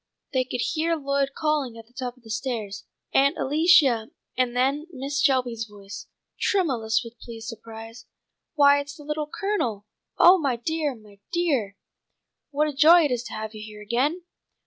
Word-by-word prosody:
They 260 -1 +2
could 250 -1 -3
hear 330 +1 0
Lloyd 280 -2 -1
calling 295 -7 0
at 225 - -11
the 240 - -29
top 250 -1 -5
of 250 - -24
the 225 - -10
stairs, 215 -3 -4 0.3
"Aunt 280 +1 +4
Alicia," 280 -6 +4 0.3
and 250 -1 0
then 275 +5 +1
Mrs. 280 0 -3
Shelby's 250 -5 +1
voice, 200 -1 -10 0.3
tremulous 250 - +1
with 235 0 -12
pleased 230 -1 -8
surprise: 225 0 -10 0.5
"Why 285 -1 +6
it's 285 +1 -6
the 300 - -12
Little 300 0 -3
Colonel! 315 - -2 0.3
Oh, 365 +2 +7
my 275 -6 0
dear! 295 +3 -2
My 210 -3 -18
dear! 275 - 0 0.7
what 300 +1 +1
a 300 - -3
joy 325 +5 +7
it 290 - +1
is 245 -2 0
to - - -8
have 215 0 -5
you 215 - -8
here 210 -1 -10
again!" 275 - 0
260 Hz, 170 wpm, -25 LUFS, 225-300 Hz, 0.7 s, Oh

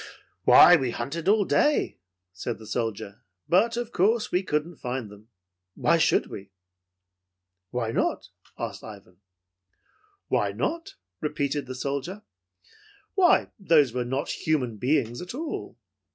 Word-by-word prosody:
"Why, - - +9
we 130 - -1
hunted 140 +9 -4
all 205 0 +4
day," 295 +8 +1 0.3
said 115 +6 -4
the 110 - -13
soldier, 110 -3 -4 0.3
"but 225 +7 +3
of 240 -1 -3
course 215 +4 +1
we 180 - +2
couldn't 165 -1 -2
find 125 -4 -5
them. 105 +1 -15 0.5
Why - - +2
should - - +3
we?" 100 - -9 1.2
"Why 115 -1 -2
not?" - - -1 0.3
asked - - -5
Ivan. 100 -4 -12 1.1
"Why - - 0
not?" 335 +1 -3 0.2
repeated 145 -2 -2
the 130 - -6
soldier. 140 +10 -4 0.9
"Why, 370 -3 +4
those 155 - +3
were 125 -1 -1
not 130 +4 -3
human 130 -8 -1
beings 125 -1 0
at 180 +6 -7
all. 315 +2 -5
140 Hz, 130 wpm, -26 LUFS, 120-185 Hz, 1.2 s, Why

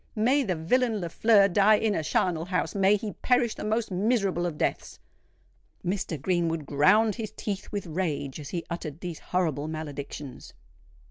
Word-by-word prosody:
May 250 +6 +3
the 195 -9 -1
villain 225 +7 +1
Lafleur 200 +4 +4
die 200 +3 +5
in 215 0 +1
a - - 0
charnel 165 +1 0
house—may 195 +2 +2
he 210 0 -4
perish 245 -3 +2
the - - -7
most 220 0 -1
miserable 195 -3 +1
of 160 -3 -5
deaths!" - - -2 0.9
Mr. 180 -4 -2
Greenwood 165 -1 0
ground 190 +11 +4
his 220 -2 -5
teeth 200 -2 -4
with 205 -2 -3
rage 155 -5 -3
as 145 - -8
he 170 -2 -4
uttered 160 -2 -5
these 175 -3 -5
horrible 160 -5 -1
maledictions. 145 -3 -7
185 Hz, 155 wpm, -27 LUFS, 160-210 Hz, 0.9 s, die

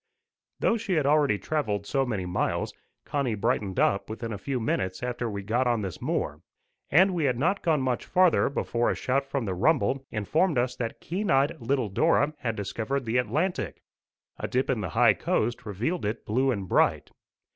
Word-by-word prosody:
Though 230 - +2
she 215 -3 -2
had 155 -5 +2
already 145 -7 +3
travelled 105 -8 -2
so 135 +4 0
many 100 -6 -2
miles, 90 - -1 0.3
Connie 135 -6 -1
brightened 100 -1 -1
up 100 - +2
within 115 +1 -5
a - - -4
few 130 +4 -2
minutes 95 -3 -2
after 120 -1 -2
we 100 -2 -5
got 120 +5 +1
on 120 -3 +1
this 95 -3 -6
moor; 75 +2 -2 0.5
and 185 +6 +5
we 165 -4 0
had 125 -3 +1
not 180 +10 +1
gone 155 -5 +2
much 125 -2 -1
farther 180 -5 +4
before 120 -4 0
a - - 0
shout 135 +2 0
from 135 -3 -2
the 95 - -2
rumble 135 - +2
informed 150 - +1
us 125 +1 +1
that 115 -2 -4
keen 195 +5 -3
eyed 135 +4 +3
little 130 0 0
Dora 150 - +2
had 115 -4 -2
discovered 115 +6 -3
the 115 +2 0
Atlantic: 150 - -1 0.6
a - - -2
dip - - 0
in - - -1
the - - -3
high - - +6
coast 115 0 -1
revealed 120 - -2
it 105 +3 -3
blue 130 +5 +1
and 100 -7 -2
bright. - - +2
125 Hz, 190 wpm, -27 LUFS, 105-145 Hz, 0.6 s, high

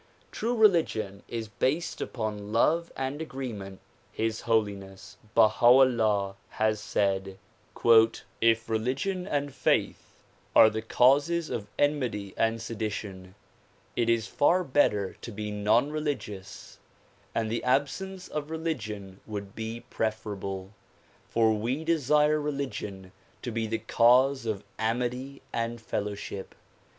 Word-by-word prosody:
True 235 +3 -1
religion 165 - +2
is 115 -2 -4
based 140 +10 -1
upon 105 -3 -4
love 165 +9 +2
and 135 +3 -3
agreement. 115 -11 -6 0.3
His 110 0 -2
Holiness 100 -4 -1 0.2
Baha 110 +2 +4
'Ullah 110 -6 +4
has 110 -1 0
said 95 -2 -1 1.0
"If 115 0 +3
religion 130 - -1
and 145 -3 -1
faith - - -1 0.3
are 110 - +8
the 110 +1 -3
causes 145 +9 +3
of 105 -3 -3
enmity 125 -9 0
and 115 0 +1
sedi 115 -1 -3
tion, 95 -3 -7 0.6
it 115 -1 +1
is 115 -2 +2
far 175 +9 +2
better 105 - +1
to 120 - -7
be 105 0 -5
non 105 +7 +2
religious, 135 -11 -5 0.6
and 110 -1 0
the 120 - -2
absence 160 +9 -1
of 150 0 -4
religion 110 - -4
would 100 -2 -6
be 115 +1 -5
preferable; 100 -3 -3 0.6
for 110 -1 +3
we 120 +8 -2
desire 150 -1 +3
religion 130 -10 -4 0.3
to 120 - -3
be 115 0 -2
the 115 +1 -1
cause 125 +3 +3
of 105 -2 -2 0.2
amity 125 +4 -2
and 115 0 -2
fellowship. 100 -3 -5
115 Hz, 120 wpm, -28 LUFS, 105-140 Hz, 1.0 s, are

